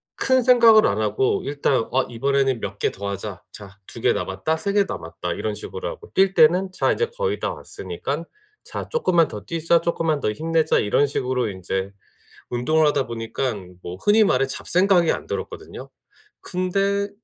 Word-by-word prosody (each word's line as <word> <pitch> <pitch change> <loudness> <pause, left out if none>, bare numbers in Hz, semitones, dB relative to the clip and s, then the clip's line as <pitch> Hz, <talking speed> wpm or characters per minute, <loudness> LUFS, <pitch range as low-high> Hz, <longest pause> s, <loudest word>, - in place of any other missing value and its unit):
큰 260 -1 +2
생각을 230 -3 +7
안 100 - +1
하고 110 +5 +1
일단 140 -4 0
'아 130 0 +2
이번에는 135 +1 0
몇 100 -1 -5
개 - - 0
더 100 +1 -5
하자. 100 0 -6
자 100 -1 -13
2 - - -9
개 - - +3
남았다. 100 +12 -2
3 200 +4 -2
개 205 0 +4
남았다.' - - -5
이런 - - -3
식으로 465 +2 -6
하고 470 -3 -10
뛸 195 0 +3
때는 180 +4 +4
'자. 185 - +1
인제 465 - 0
거의 475 -4 -1
다 - - -2
왔으니깐 - - -5 0.4
자. - - -6
쪼끔만 175 - +2
더 105 - -7
뛰자. 165 +2 +1
쪼끔만 165 -3 0
더 105 - 0
힘내자.' 160 +5 +1
이런 105 +7 +2
식으로 125 -4 -1
인제 95 0 -4 0.6
운동을 155 +6 +2
하다 140 -3 +1
보니깐 115 -5 -4
뭐 90 - -6
흔히 210 - +4
말해 135 -9 +2
잡생각이 180 +4 +2
안 - - -4
들었거든요. - - -6 0.5
근데 195 +2 -1
155 Hz, 325 characters per minute, -22 LUFS, -, 0.6 s, 생각을